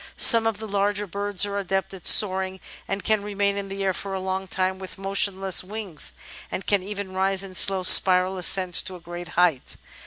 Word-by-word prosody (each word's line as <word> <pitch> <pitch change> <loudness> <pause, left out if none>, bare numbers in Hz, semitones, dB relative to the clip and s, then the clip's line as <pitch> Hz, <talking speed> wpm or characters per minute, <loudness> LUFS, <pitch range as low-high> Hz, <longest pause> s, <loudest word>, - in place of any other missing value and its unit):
Some 230 -2 +6
of 225 -2 -2
the 220 +1 -8
larger 205 0 -1
birds 200 +1 -2
are 200 0 -4
adepts 195 -1 -3
at 185 -3 -6
soaring, 190 -2 +4 0.3
and 195 +1 -4
can 215 -1 0
re 205 0 -8
main 200 0 0
in 200 -1 -6
the 195 0 -5
air 190 -1 0
for 195 +1 -6
a - - -4
long 190 0 -4
time 185 0 -2
with 190 -1 -10
motionless 195 -1 +1
wings, 195 -4 -4 0.4
and 195 - -6
can 205 -2 +1
even 200 0 -7
rise 190 +1 0
in 190 -1 -10
slow 190 +1 +3
spiral 185 0 +5
ascent 180 0 +1
to 185 - -5
a - - -11
great 175 +1 -9
height. 170 -7 0
195 Hz, 210 wpm, -23 LUFS, 185-200 Hz, 0.4 s, Some